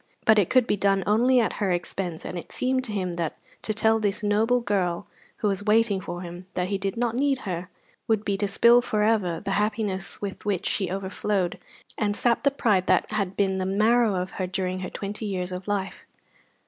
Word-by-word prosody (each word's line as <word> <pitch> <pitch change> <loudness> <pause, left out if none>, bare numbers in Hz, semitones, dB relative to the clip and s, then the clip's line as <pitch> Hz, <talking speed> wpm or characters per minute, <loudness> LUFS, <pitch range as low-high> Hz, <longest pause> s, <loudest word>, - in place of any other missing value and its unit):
But 220 -1 +6
it 195 - +2
could 255 -2 +4
be 210 - +1
done 195 -1 +2
only 245 +5 +4
at 230 - +1
her 200 - +2
expense, 175 -1 -3
and - - -5
it 175 - -7
seemed 255 0 0
to 220 - -5
him 185 -4 -2
that 165 - -3 0.2
to - - -2
tell 220 +1 +2
this 210 -1 -1
noble 220 +4 +2
girl, 195 -5 -1 0.3
who 210 - 0
was 195 -1 0
waiting 210 -2 +3
for 175 0 -6
him, 175 +1 -9
that 180 0 -1
he 200 -1 -1
did 195 +3 -3
not 235 -1 0
need 275 +1 +2
her, 180 -1 -4 0.4
would 220 -2 +1
be 200 - +1
to 205 - 0
spill 235 +4 +5
for 215 -3 0
ever 200 -7 +1
the 200 - -3
happiness 210 -3 -2
with 200 -2 -6
which 200 -4 -1
she 190 -3 0
overflowed, 190 0 -2 0.4
and 205 -1 +1
sap 235 +1 +2
the 280 - +4
pride 210 -9 +1
that - - +2
had 200 -3 -2
been 190 -2 +1
the 185 - -1
marrow 215 +2 +3
of 180 +1 -2
her 185 - -3
during 185 0 -2
her 185 - -4
twenty 210 +2 -5
years 185 -2 -3
of 180 +1 -6
life. 200 -2 -3
200 Hz, 215 wpm, -25 LUFS, 185-220 Hz, 0.4 s, But